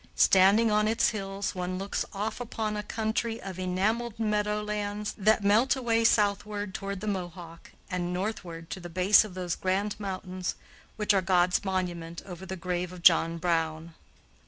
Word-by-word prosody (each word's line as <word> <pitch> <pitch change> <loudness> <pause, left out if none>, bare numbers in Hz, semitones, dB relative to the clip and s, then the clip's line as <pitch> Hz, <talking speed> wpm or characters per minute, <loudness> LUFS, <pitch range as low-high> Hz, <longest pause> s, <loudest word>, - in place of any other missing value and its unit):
Standing 200 +4 +5
on 210 0 +3
its 225 +1 +3
hills, 195 -2 -3
one 180 0 -3
looks 195 +2 -2
off 210 +4 -3
upon 220 -2 -3
a 210 - -2
country 225 +2 -2
of 185 -1 -7
enameled 210 +6 -1
meadow 210 -1 0
lands, 210 0 -3
that 215 0 +3
melt 220 +7 +4
away 230 -3 +1
southward 205 -2 +1
toward 195 0 -5
the 215 - -5
Mohawk, 175 -4 -5 0.2
and 180 -1 -2
northward 180 -4 -4
to - - -4
the 175 -1 -8
base 185 +5 +5
of 205 -4 -9
those 180 -2 -2
grand 195 +2 -1
mountains 185 -2 -4 0.4
which 210 -1 +2
are 195 - +3
'God's 180 0 +2
monument 175 -3 -3
over 185 0 -9
the 190 - -4
grave 180 0 -3
of 180 -1 -11
John 165 -1 +5
Brown.'" 165 -1 -1
195 Hz, 165 wpm, -28 LUFS, 180-210 Hz, 0.4 s, Standing